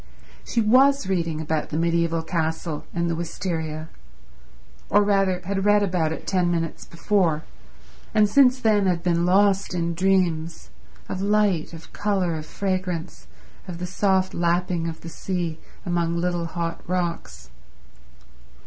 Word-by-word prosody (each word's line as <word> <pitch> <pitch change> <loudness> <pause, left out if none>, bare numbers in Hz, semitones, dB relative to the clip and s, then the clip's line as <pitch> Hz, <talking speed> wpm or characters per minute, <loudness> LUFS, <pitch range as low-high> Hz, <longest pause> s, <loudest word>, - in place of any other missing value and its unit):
She 235 - 0
was 265 +4 +4
reading 170 -4 -1
about 160 -1 -2
the 155 - -3
mediaeval 170 0 +1
castle 160 -1 -3
and 170 0 -1
the 170 - 0
wisteria, 160 -2 -4 1.0
or 205 +1 +5
rather 195 -3 +2
had 195 +2 -2
read 205 0 +4
about 175 -5 0
it 160 - -6
ten 180 -2 +1
minutes 165 -2 -2
before, 170 -3 +1 0.7
and 215 -1 +4
since 255 +3 +5
then 210 -4 +3
had 175 -2 0
been 175 -1 +1
lost 195 0 +3
in 170 -1 -1
dreams—of 175 0 -2
light, 200 -5 +1
of 165 -1 -12
colour, 195 -5 0
of 155 0 -6
fragrance, 185 -3 -3 0.4
of 180 -2 -6
the 180 - -4
soft 190 +1 +1
lapping 170 0 0
of 160 - -8
the - - -9
sea 170 -2 -3 0.3
among 170 -1 0
little 175 -1 -1
hot 165 0 -4
rocks 175 - -3
175 Hz, 140 wpm, -24 LUFS, 165-195 Hz, 1.0 s, or